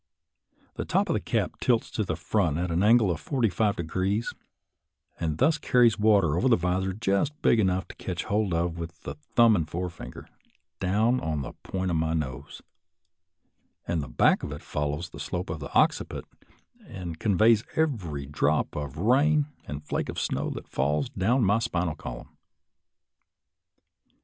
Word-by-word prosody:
The -, -, -2 dB
top -, -, +1 dB
of -, -, +2 dB
the -, -, +1 dB
cap -, -, -2 dB
tilts 120 Hz, -3 st, +1 dB
to 110 Hz, -, -1 dB
the 85 Hz, -4 st, -2 dB
front 85 Hz, -2 st, 0 dB
at 90 Hz, 0 st, -2 dB
an 85 Hz, +2 st, +1 dB
angle 110 Hz, -2 st, +5 dB
of 85 Hz, -, -3 dB
forty 125 Hz, -6 st, 0 dB
five 105 Hz, +2 st, +1 dB
degrees, 95 Hz, +6 st, -1 dB, 0.9 s
and 80 Hz, -3 st, -1 dB
thus 155 Hz, -, +3 dB
carries 120 Hz, -5 st, +3 dB
water 100 Hz, -8 st, +4 dB
over 125 Hz, +9 st, +2 dB
a 115 Hz, -, +6 dB
visor 90 Hz, +2 st, 0 dB
just 110 Hz, +9 st, 0 dB
big 115 Hz, -, +4 dB
enough 95 Hz, -2 st, +1 dB
to -, -, -10 dB
catch 90 Hz, -3 st, -4 dB
hold 105 Hz, -1 st, 0 dB
of 85 Hz, 0 st, -1 dB
with 85 Hz, -1 st, -7 dB
the -, -, -6 dB
thumb 110 Hz, +10 st, +3 dB
and 80 Hz, -5 st, -1 dB
forefinger, 85 Hz, 0 st, -6 dB, 0.5 s
down 110 Hz, +7 st, +2 dB
on 80 Hz, -, -2 dB
the -, -, -7 dB
point 95 Hz, -1 st, -3 dB
of 85 Hz, -, +1 dB
my 80 Hz, +1 st, 0 dB
nose, 70 Hz, -2 st, -5 dB, 1.2 s
and 85 Hz, -2 st, 0 dB
the 70 Hz, -, -6 dB
back -, -, +3 dB
of -, -, -5 dB
it 75 Hz, -, -7 dB
follows 75 Hz, +3 st, -3 dB
the 75 Hz, -, -10 dB
slope 90 Hz, +4 st, -4 dB
of 80 Hz, -, -4 dB
the 70 Hz, -, -7 dB
occiput, -, -, +2 dB, 0.6 s
and 85 Hz, -4 st, -7 dB
conveys 110 Hz, +2 st, +4 dB
every 95 Hz, -, -1 dB
drop 75 Hz, +1 st, 0 dB
of 75 Hz, -1 st, -5 dB
rain 140 Hz, -, +3 dB, 0.2 s
or 75 Hz, 0 st, -5 dB
flake 75 Hz, -, -3 dB
of -, -, -4 dB
snow -, -, -1 dB
that -, -, -7 dB
falls, 75 Hz, -, 0 dB
down 120 Hz, +1 st, +1 dB
my 105 Hz, +3 st, +3 dB
spinal 90 Hz, -7 st, -1 dB
column. -, -, -9 dB
90 Hz, 170 wpm, -27 LUFS, 80-110 Hz, 1.2 s, a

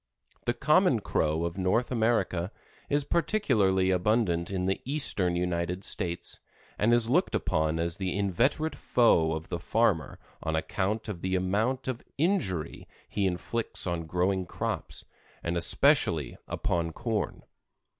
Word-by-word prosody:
The 120 Hz, -, 0 dB
common 150 Hz, -, +3 dB
Crow 80 Hz, -3 st, 0 dB
of 85 Hz, +3 st, -4 dB
North 95 Hz, +8 st, +1 dB
America 110 Hz, -6 st, +1 dB, 0.4 s
is 145 Hz, 0 st, +2 dB
particularly 110 Hz, -, +2 dB
abundant 90 Hz, -2 st, +1 dB
in 95 Hz, -2 st, -2 dB
the 95 Hz, +1 st, 0 dB
Eastern 110 Hz, -11 st, 0 dB
United 90 Hz, +1 st, -1 dB
States, 85 Hz, -4 st, -3 dB, 0.4 s
and 110 Hz, +3 st, +3 dB
is 120 Hz, -1 st, +3 dB
looked 170 Hz, +10 st, +2 dB
upon 80 Hz, -1 st, 0 dB
as 85 Hz, 0 st, -1 dB
the 95 Hz, -1 st, -2 dB
inveterate 125 Hz, -, +1 dB
foe 85 Hz, -10 st, +3 dB
of 80 Hz, +1 st, -5 dB
the 85 Hz, -, -3 dB
farmer 95 Hz, -, +1 dB, 0.2 s
on 80 Hz, -, -1 dB
account 100 Hz, +6 st, -1 dB
of 95 Hz, -6 st, -5 dB
the 95 Hz, 0 st, 0 dB
amount 105 Hz, +9 st, 0 dB
of 130 Hz, -2 st, -3 dB
injury 140 Hz, -, -1 dB, 0.2 s
he 100 Hz, -2 st, 0 dB
inflicts 100 Hz, +6 st, -1 dB
on 85 Hz, -3 st, -2 dB
growing 90 Hz, +2 st, 0 dB
crops, -, -, -4 dB, 0.4 s
and 85 Hz, +1 st, -1 dB
especially 85 Hz, -, +3 dB
upon 85 Hz, -2 st, -1 dB
corn. 115 Hz, 0 st, -3 dB
95 Hz, 135 wpm, -28 LUFS, 85-120 Hz, 0.4 s, common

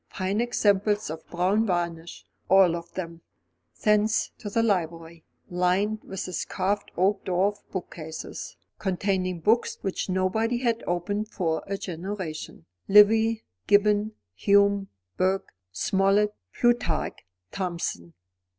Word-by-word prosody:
Fine 195 Hz, +3 st, -1 dB
examples 210 Hz, -5 st, +1 dB
of 160 Hz, 0 st, -8 dB
brown 190 Hz, +6 st, +1 dB
varnish, 170 Hz, -2 st, -3 dB, 0.2 s
all 190 Hz, -3 st, +6 dB
of 170 Hz, 0 st, -7 dB
them. 170 Hz, -2 st, -6 dB, 0.6 s
Thence 210 Hz, +1 st, +2 dB
to 210 Hz, -, -5 dB
the 225 Hz, +3 st, +1 dB
library, 170 Hz, -5 st, -2 dB, 0.2 s
lined 185 Hz, +5 st, 0 dB
with 190 Hz, -1 st, -5 dB
its 180 Hz, -, -3 dB
carved 200 Hz, +2 st, -2 dB
oak 195 Hz, +3 st, +2 dB
dwarf 190 Hz, +3 st, +1 dB
bookcases, 160 Hz, -4 st, -7 dB, 0.2 s
containing 185 Hz, -2 st, -1 dB
books 225 Hz, +7 st, +2 dB
which 195 Hz, 0 st, -3 dB
nobody 190 Hz, +6 st, +1 dB
had 235 Hz, -2 st, 0 dB
opened 205 Hz, +5 st, -1 dB
for 165 Hz, -6 st, -1 dB
a 200 Hz, 0 st, -2 dB
generation 175 Hz, -, -6 dB, 0.2 s
Livy, 220 Hz, +2 st, +6 dB, 0.2 s
Gibbon, 210 Hz, +1 st, +3 dB, 0.2 s
Hume, 200 Hz, -, +3 dB, 0.3 s
Burke, 190 Hz, +1 st, 0 dB, 0.2 s
Smollett, 195 Hz, -, +2 dB, 0.2 s
Plutarch, 240 Hz, -10 st, +1 dB, 0.3 s
Thomson. 170 Hz, -, -4 dB
195 Hz, 115 wpm, -26 LUFS, 175-210 Hz, 0.6 s, all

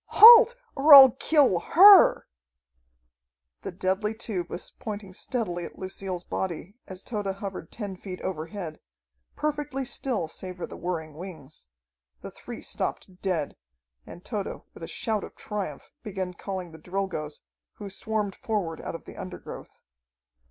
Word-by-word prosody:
Halt, 470 Hz, +2 st, +10 dB, 0.2 s
or 290 Hz, +1 st, +8 dB
I'll 265 Hz, -2 st, +11 dB
kill 270 Hz, -, +3 dB
her!" 390 Hz, -, +7 dB, 1.4 s
The -, -, -6 dB
deadly 190 Hz, +4 st, -1 dB
tube 190 Hz, -6 st, -4 dB
was -, -, -6 dB
pointing 205 Hz, -3 st, -7 dB
steadily 185 Hz, -5 st, -3 dB
at -, -, -9 dB
Lucille's 185 Hz, -1 st, -5 dB
body 180 Hz, +1 st, -5 dB
as 185 Hz, 0 st, -9 dB
Tode 210 Hz, -4 st, -4 dB
hovered 195 Hz, -3 st, -6 dB
ten 205 Hz, -4 st, -6 dB
feet 185 Hz, 0 st, -8 dB
overhead, 165 Hz, -1 st, -6 dB, 0.6 s
perfectly 295 Hz, -3 st, -3 dB
still 245 Hz, -9 st, -1 dB
save 185 Hz, +3 st, -7 dB
for 180 Hz, -, -5 dB
the -, -, -11 dB
whirring 165 Hz, -3 st, -5 dB
wings. 155 Hz, -, -10 dB, 0.5 s
The -, -, -8 dB
three -, -, -10 dB
stopped 185 Hz, 0 st, -4 dB
dead, 170 Hz, -7 st, -2 dB, 0.5 s
and 175 Hz, -, -13 dB
Tode, 210 Hz, -4 st, -5 dB
with -, -, -14 dB
a -, -, -6 dB
shout 220 Hz, -4 st, -2 dB
of -, -, -10 dB
triumph, 200 Hz, -9 st, -6 dB
began 190 Hz, -4 st, -5 dB
calling 185 Hz, -1 st, -6 dB
the 160 Hz, -, -13 dB
Drilgoes, 175 Hz, -4 st, -4 dB, 0.3 s
who 205 Hz, -, -9 dB
swarmed 205 Hz, 0 st, -3 dB
forward 190 Hz, -8 st, -3 dB
out -, -, -6 dB
of -, -, -10 dB
the -, -, -11 dB
undergrowth. 185 Hz, 0 st, -10 dB
190 Hz, 145 wpm, -26 LUFS, 175-220 Hz, 1.4 s, I'll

